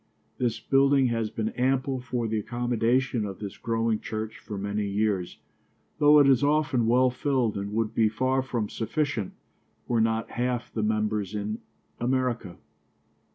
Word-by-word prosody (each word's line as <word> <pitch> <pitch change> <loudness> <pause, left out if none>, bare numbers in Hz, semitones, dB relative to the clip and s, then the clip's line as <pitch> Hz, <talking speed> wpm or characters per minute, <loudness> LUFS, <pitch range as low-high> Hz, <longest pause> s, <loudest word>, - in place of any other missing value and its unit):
This 115 -2 0
building 135 +1 +3
has 115 -2 -1
been 110 0 -2
ample 130 +2 0
for 125 -2 -2
the 110 0 -1
accommodation 120 +1 0
of 100 -2 -5
this 100 -2 -6
growing 115 -1 0
church 110 0 -5
for 105 - -7
many 100 +1 -2
years, 100 -3 -1 0.6
though 150 0 +7
it 145 -2 +6
is 135 -1 +4
often 145 -5 +2
well 125 +2 +4
filled 125 -3 0
and 100 0 -4
would 110 0 0
be 110 -1 +3
far 130 +4 +1
from 120 -5 -2
sufficient, 115 -2 -2 0.5
were 115 -2 +2
not 110 0 0
half 125 0 -2
the 110 - -1
members 105 -1 -1
in 105 +1 -3 0.4
America. 120 -7 -1
115 Hz, 155 wpm, -27 LUFS, 110-130 Hz, 0.6 s, though